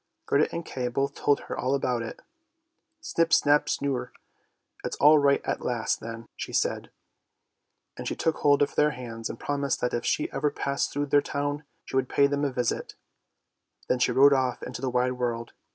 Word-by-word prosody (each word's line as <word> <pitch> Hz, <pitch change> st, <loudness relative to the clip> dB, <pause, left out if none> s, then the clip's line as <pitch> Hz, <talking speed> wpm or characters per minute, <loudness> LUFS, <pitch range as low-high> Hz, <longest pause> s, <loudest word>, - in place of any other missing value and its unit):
Gerda 145 Hz, +2 st, +2 dB
and 170 Hz, 0 st, -4 dB
Kay 125 Hz, -2 st, -3 dB
both 135 Hz, +3 st, -1 dB
told 145 Hz, 0 st, +1 dB
her -, -, -6 dB
all 130 Hz, +2 st, 0 dB
about 125 Hz, -3 st, 0 dB
it. 115 Hz, -, -7 dB, 0.4 s
" 325 Hz, -1 st, -51 dB
Snip, 165 Hz, -, 0 dB
snap, 145 Hz, 0 st, +4 dB
snurre, 130 Hz, -3 st, -1 dB, 0.7 s
it's -, -, -3 dB
all 150 Hz, +1 st, +6 dB
right 140 Hz, -1 st, +3 dB
at -, -, -2 dB
last 120 Hz, -2 st, -1 dB
then! 115 Hz, +1 st, -7 dB
" -, -, -55 dB
she -, -, -6 dB
said, -, -, -1 dB, 1.1 s
and -, -, -6 dB
she -, -, -2 dB
took 160 Hz, -1 st, 0 dB
hold 145 Hz, 0 st, +4 dB
of 140 Hz, -, -2 dB
their 150 Hz, -, +3 dB
hands 115 Hz, -2 st, -6 dB
and 115 Hz, -, -7 dB
promised 140 Hz, -1 st, -1 dB
that 125 Hz, -, 0 dB
if 120 Hz, -, -1 dB
she 150 Hz, -, 0 dB
ever 145 Hz, +2 st, 0 dB
passed 140 Hz, -1 st, -2 dB
through 145 Hz, +1 st, -1 dB
their 145 Hz, 0 st, +4 dB
town 145 Hz, +1 st, -3 dB, 0.2 s
she -, -, -7 dB
would 130 Hz, -1 st, +1 dB
pay 140 Hz, -, +4 dB
them 145 Hz, +1 st, 0 dB
a 140 Hz, -, +1 dB
visit. 125 Hz, -2 st, -2 dB, 0.9 s
Then 125 Hz, -, +2 dB
she -, -, +3 dB
rode 140 Hz, +1 st, +6 dB
off 130 Hz, -2 st, 0 dB
into -, -, -6 dB
the 130 Hz, -, -1 dB
wide 125 Hz, +1 st, +1 dB
world. 120 Hz, -2 st, -3 dB
140 Hz, 200 wpm, -27 LUFS, 125-145 Hz, 1.1 s, all